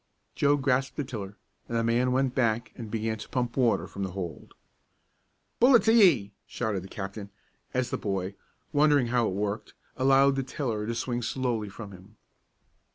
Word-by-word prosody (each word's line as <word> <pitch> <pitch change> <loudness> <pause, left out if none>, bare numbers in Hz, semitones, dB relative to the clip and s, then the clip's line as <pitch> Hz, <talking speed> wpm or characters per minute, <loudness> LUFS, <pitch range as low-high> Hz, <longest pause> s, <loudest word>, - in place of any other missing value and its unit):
Joe 145 0 +3
grasped 135 -1 0
the 145 - 0
tiller, 105 -6 -7 0.3
and 115 - -1
the 115 - +1
man 120 +2 +2
went 130 0 +1
back 115 -3 0
and 115 -3 -7
began 110 0 -2
to 105 - -9
pump 125 -2 -2
water 115 -7 +2
from 100 - -8
the 95 -2 -3
hold. 90 -4 -7 1.0
"Pull 250 +2 +7
it 235 - +6
to 225 - +4
ye!" 150 - +5
shouted 110 -5 -2
the - - -9
captain, 100 0 -6 0.4
as 125 -1 -1
the - - -2
boy, 95 -1 -2 0.4
wondering 145 -4 +4
how 120 -2 +2
it 95 - -2
worked, 105 +1 -3 0.2
allowed 135 +1 +4
the - - +1
tiller 120 -5 -3
to 115 - -2
swing 120 +1 -2
slowly 120 -3 -2
from 100 0 -9
him. 95 +3 -15
115 Hz, 180 wpm, -28 LUFS, 105-130 Hz, 1.0 s, Pull